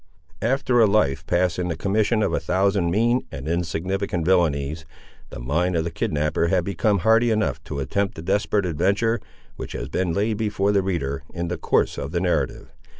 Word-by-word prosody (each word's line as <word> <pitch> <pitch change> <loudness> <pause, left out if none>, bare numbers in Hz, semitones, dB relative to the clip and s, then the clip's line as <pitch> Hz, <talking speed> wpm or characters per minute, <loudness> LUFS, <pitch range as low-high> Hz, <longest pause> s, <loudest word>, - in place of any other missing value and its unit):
After 125 0 +2
a 110 - +6
life 100 -10 +1
passed 90 -1 +1
in 90 - -1
the 85 - -2
commission 105 +5 +1
of - - 0
a - - +1
thousand 95 -1 +1
mean 120 +7 +1
and 70 +2 -7
insignificant 90 +1 -2
villanies, 80 -4 +1 0.5
the - - -8
mind 85 +9 0
of 80 - +1
the 85 - -4
kidnapper 75 +1 0
had 90 0 +2
become 100 +2 +1
hardy 115 +2 +5
enough 105 - 0
to 75 - -5
attempt 95 +9 -1
the 80 - -8
desperate 100 +1 +1
adventure, 100 +8 +1 0.4
which - - -7
has - - -5
been 90 -2 -1
laid 105 +5 0
before 105 -2 0
the 100 -1 +3
reader, 70 -8 -2
in 85 -1 -3
the 90 - -2
course - - +1
of 70 - -5
the 85 - +1
narrative. 90 -1 -1
90 Hz, 190 wpm, -23 LUFS, 80-105 Hz, 0.5 s, a